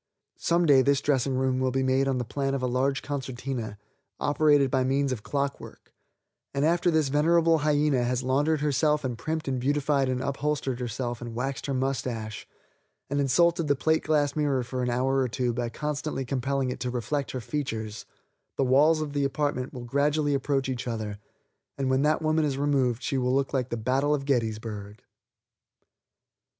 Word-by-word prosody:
Some 170 +1 +2
day 140 -4 +6
this 140 +1 +3
dressing 135 -2 +1
room 130 0 +1
will 130 0 +1
be 130 +1 0
made 130 +1 +2
on 135 -1 +1
the 125 - -2
plan 135 +3 -2
of 130 - -3
a - - +1
large 135 +2 0
concertina, 130 -5 -4 0.4
operated 145 -2 +3
by 130 -1 +2
means 135 +1 +1
of 120 -4 -3
clockwork, 140 +4 -4 0.6
and 140 +2 +2
after 175 +2 +2
this 160 -4 +2
venerable 165 +3 +3
hyena 145 -3 +2
has 125 +1 -1
laundered 145 +4 +1
herself 150 +1 +2
and 125 -2 -2
primped 160 +5 -3
and 130 -2 -1
beautified 140 0 +1
and 130 -1 -1
upholstered 140 -1 -2
herself 120 0 -4
and 120 -1 -6
waxed 135 +4 -3
her 140 - -1
mustache, 125 -5 -3 0.6
and 140 - +1
insulted 170 +4 +3
the 145 - +3
plate 160 +4 +1
glass 150 -2 +1
mirror 145 -4 +1
for 125 +1 -4
an 125 - 0
hour 130 +3 +1
or 130 - +2
two 125 0 -1
by 120 0 -2
constantly 150 0 -3
compelling 135 +1 -1
it - - -6
to 125 - -2
reflect 125 +2 -2
her 130 - -4
features, 110 -5 -4 0.5
the 135 - +2
walls 150 +5 +4
of 150 -2 -4
the 145 -1 0
apartment 140 -2 -1
will 125 -2 -8
gradually 145 +3 +1
approach 135 0 0
each 125 -2 -3
other, 110 -3 -4 0.6
and 135 -1 0
when 130 +1 +2
that 155 +2 +2
woman 155 0 +2
is 140 -3 -1
removed 135 -4 +1
she 135 - 0
will 125 +1 +1
look 140 0 0
like 130 -2 0
the 120 - -2
battle 135 +6 +1
of 135 -2 -5
Gettysburg. 110 -5 -2
135 Hz, 185 wpm, -27 LUFS, 125-145 Hz, 0.6 s, day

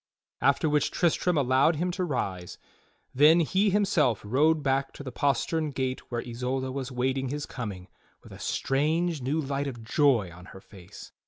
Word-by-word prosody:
After 140 +3 +2
which 150 -1 +1
Tristram 175 0 +1
allowed 135 +4 +3
him 175 +4 -1
to 185 +1 -3
rise, 95 - -3 0.6
then 155 +6 +6
he 195 +6 +2
himself 185 - +2
rode 150 +7 +2
back 135 0 0
to - - -9
the 130 - -6
postern 150 +4 0
gate 130 -2 -4
where 120 -1 -3
Isolda 130 +2 -3
was 135 0 -5
waiting 130 +1 -1
his 145 +2 -4
coming 100 -7 -7 0.4
with - - -14
a - - -11
strange 155 +3 0
new 140 +6 -1
light 140 -1 -2
of 120 -4 -7
joy 115 - +2
on 90 +1 -13
her - - -11
face. 95 0 -13
135 Hz, 170 wpm, -27 LUFS, 125-155 Hz, 0.6 s, then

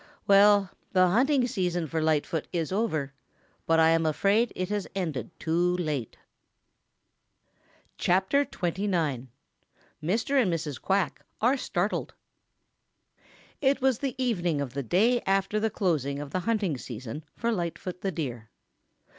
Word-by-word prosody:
Well, 200 -1 +5 0.2
the 185 -1 +5
hunting 260 +6 +3
season 180 -7 -1
for 160 +1 -2
Lightfoot 155 0 0
is 165 -3 -2
over, 160 -10 -1 0.5
but 165 0 +4
I 160 0 +6
am 165 0 +3
afraid 200 +9 +2
it 185 0 -3
has 205 -2 -2
ended 160 -9 -3
too 175 +2 +1
late." 150 -9 -3 1.8
CHAPTER 190 +11 +3
XXIX 170 - -2 0.7
Mr. 225 - +1
AND 195 -7 +1
MRS. 155 -5 -3
QUACK 195 -2 0 0.2
ARE 245 +5 +3
STARTLED 200 -6 -2 1.5
It 270 -1 +3
was 265 -3 +2
the 270 -3 -2
evening 180 - 0
of 135 -3 -3
the 140 - -2
day 220 - +2
after 195 +2 +1
the 220 +1 +1
closing 155 - 0
of 145 -1 -6
the 185 - 0
hunting 195 - -1
season 125 +5 -7
for 235 0 -1
Lightfoot 180 -1 -4
the 195 - -1
Deer. 125 -9 -5
180 Hz, 135 wpm, -27 LUFS, 155-210 Hz, 1.8 s, I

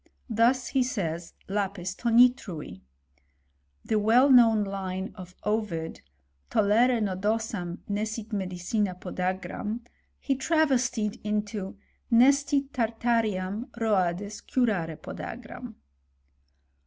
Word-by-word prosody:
Thus 240 +3 +3
he 265 - +2
says, 175 -9 -3
lapis 195 -2 -2
tanitrui. 230 - +2 1.0
The 215 - +1
well 240 +6 +5
known 225 -4 +6
line 190 -1 -4
of 185 -2 -11
Ovid, 210 -7 -2 0.5
Tollere 230 +4 +3
nodosam 205 -2 -2
nescit 215 +2 -3
medicina 185 +1 -1
podagram, 190 +5 -3
^ - - -24 0.3
He 275 - 0
travestied 260 -7 +1
into 210 -2 -3 0.3
Nescit 275 +3 +4
tartaream 225 -3 0
Roades 200 -2 0
curare 190 - 0
podagram. - - -8
210 Hz, 90 wpm, -27 LUFS, 190-235 Hz, 1.0 s, known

